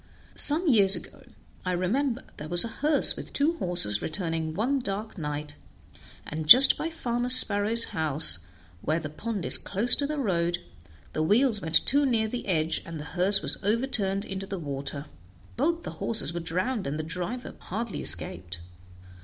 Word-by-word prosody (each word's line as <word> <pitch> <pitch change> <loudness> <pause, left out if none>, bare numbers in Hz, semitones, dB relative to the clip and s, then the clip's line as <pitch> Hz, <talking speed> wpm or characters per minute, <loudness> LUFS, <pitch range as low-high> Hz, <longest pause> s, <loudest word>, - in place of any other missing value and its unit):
Some 320 +5 +1
years 200 -8 +6
ago, 170 - -9 0.4
I 185 - -2
remember, 235 +9 -2
there 150 - -9
was 175 +4 +3
a 230 - -10
hearse 300 0 +5
with - - -9
two 305 +4 0
horses 105 - 0
returning 165 -2 -4
one 255 +8 -1
dark 210 -1 -6
night, 150 -3 -6 0.7
and 155 0 -6
just 260 +3 +10
by 325 - -4
Farmer 245 -6 -4
Sparrow's 220 -2 +3
house, 150 - +2 0.4
where 155 +2 -1
the 150 -2 -8
pond 205 +2 -5
is - - +7
close 220 +5 +3
to 285 - -2
the 305 +1 -4
road, 175 -9 -1 0.6
the 155 - -2
wheels 210 - +2
went 165 -1 +2
too 285 +2 +2
near 225 -3 0
the 240 +1 -7
edge, 160 -3 -1
and 165 -2 -9
the - - -7
hearse 190 +3 +1
was - - +1
overturned 205 -3 -1
into 195 0 -7
the 195 - -5
water; 140 -2 -6 0.5
both 335 +7 -1
the - - -7
horses 215 -8 -2
were 175 - -4
drowned, 185 - -3
and 145 +2 -4
the 155 - -4
driver 180 +10 -6
hardly 220 +2 -6
escaped. 90 0 0
195 Hz, 170 wpm, -26 LUFS, 160-240 Hz, 0.7 s, just